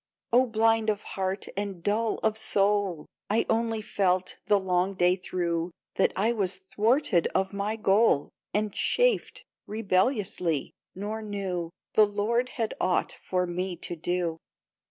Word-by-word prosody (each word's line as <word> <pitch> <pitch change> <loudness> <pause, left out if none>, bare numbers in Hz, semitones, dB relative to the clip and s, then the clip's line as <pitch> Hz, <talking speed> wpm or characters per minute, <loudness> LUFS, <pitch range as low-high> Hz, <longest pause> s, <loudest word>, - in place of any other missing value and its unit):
" - - -45
Oh, 255 +2 +5
blind 225 0 +2
of 210 -1 -1
heart 190 0 -3
and 195 -3 -4
dull 220 +3 +1
of 220 -1 +2
soul! 200 -6 +1 0.2
I 215 +3 +2
only 225 -1 0
felt, 185 -3 0
the 205 -1 +4
long 185 0 0
day 180 0 +4
through, 175 -2 -2 0.2
That 195 - +2
I 215 +4 +2
was 195 -5 0
thwarted 210 - +1
of 190 +1 +1
my 200 +2 -1
goal, 210 -7 +3 0.2
And 210 -1 0
chafed - - +1 0.2
rebelliously, 190 - 0 0.2
nor 210 +3 -4
knew 195 -5 -3 0.2
The 215 -1 +6
Lord 225 +5 0
had 225 -3 -1
aught 185 - +1
for 180 -1 -2
me 180 +1 -3
to 175 +1 -2
do 175 0 -1
200 Hz, 145 wpm, -27 LUFS, 180-220 Hz, 0.2 s, The